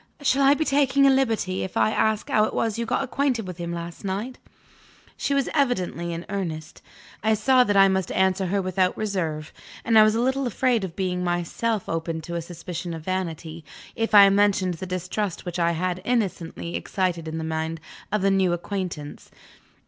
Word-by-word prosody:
Shall 275 0 +3
I 275 +1 +6
be 315 - -1
taking 275 -1 +3
a 275 - +6
liberty, 225 -8 0
if 190 - -5
I - - +3
ask 220 -1 +1
how 215 - +3
it - - -5
was 225 -1 -1
you 235 - -2
got 250 +3 0
acquainted 260 -4 -1
with 180 -1 -8
him 170 0 -4
last 170 +1 -6
night?" 205 +7 -4 0.8
She 280 - -1
was 275 -2 +1
evidently 185 - 0
in 170 +1 -5
earnest. 165 -6 -5 0.4
I 220 0 +3
saw 250 +4 +4
that 205 -4 +1
I 195 0 +7
must 190 -2 0
answer 190 0 +2
her 195 +2 0
without 185 0 0
reserve; 165 -8 -3 0.3
and 225 -1 +5
I - - +9
was 215 0 +4
a - - +1
little 265 +2 +1
afraid 240 -1 +1
of 180 -3 -5
being 180 -2 -1
myself 180 +5 -1
open 165 0 -2
to 170 +2 -7
a 170 - -2
suspicion 170 0 -6
of 160 - -8
vanity, 165 -3 -4 0.3
if 225 -1 0
I 200 -1 +10
mentioned 195 -2 +2
the 180 +3 -7
distrust 185 +2 -3
which 175 0 -4
I 170 0 +2
had 180 +2 -2
innocently 190 -7 -2
excited 180 -4 -2
in 160 0 -4
the 160 - -3
mind 160 0 -3 0.3
of 210 -2 0
my 195 - +4
new 190 -2 +2
acquaintance. 175 -4 -5
190 Hz, 195 wpm, -24 LUFS, 170-220 Hz, 0.8 s, I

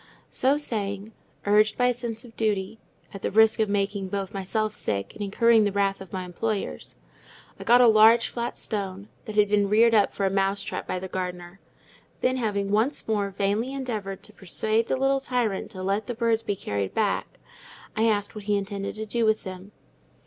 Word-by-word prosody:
So 270 +3 +2
saying—urged 210 -3 -1
by 245 - +3
a 250 - +3
sense 235 -1 -5
of 230 - -15
duty—at 205 -1 -4
the - - -1
risk 220 +2 +4
of 220 - +3
both - - -4
making 200 -1 -1 0.2
myself 210 +2 -1
sick 100 - -3
and - - -10
incurring 225 +2 +4
the 205 - +1
wrath 195 -1 0
of 190 - -10
my 185 -1 -4
employers—I 175 - -6
got 245 +1 +6
a 245 - +7
large 225 +1 +6
flat 235 0 -4
stone, 200 -1 -4 0.2
that 215 - -7
had 210 -1 +5
been 205 -1 +2
reared 230 +2 +5
up 210 -2 +4
for 200 - -2
a 190 - +1
mouse 195 +1 0
trap - - -5
by - - -2
the 185 +1 -5
gardener; 180 0 -5 0.6
then, 255 +1 +1
having 200 -4 -1
once 225 +8 +1
more 205 -2 0
vainly 205 +6 -1
endeavoured 215 -8 -4
to 210 - -10
persuade 215 +4 0
the - - 0
little 270 +1 +2
tyrant 245 -7 -1
to 185 - -7
let 200 +3 -1
the 245 - -3
birds 230 -1 +1
be 205 - -2
carried 100 - -3
back, - - -1 0.6
I 225 +1 +2
asked 205 -2 0
what 210 -2 -9
he 205 -1 +2
intended 200 0 -4
to 220 0 -4
do 230 +2 -1
with 220 0 +2
them. 190 +1 -8
210 Hz, 190 wpm, -26 LUFS, 195-225 Hz, 0.6 s, a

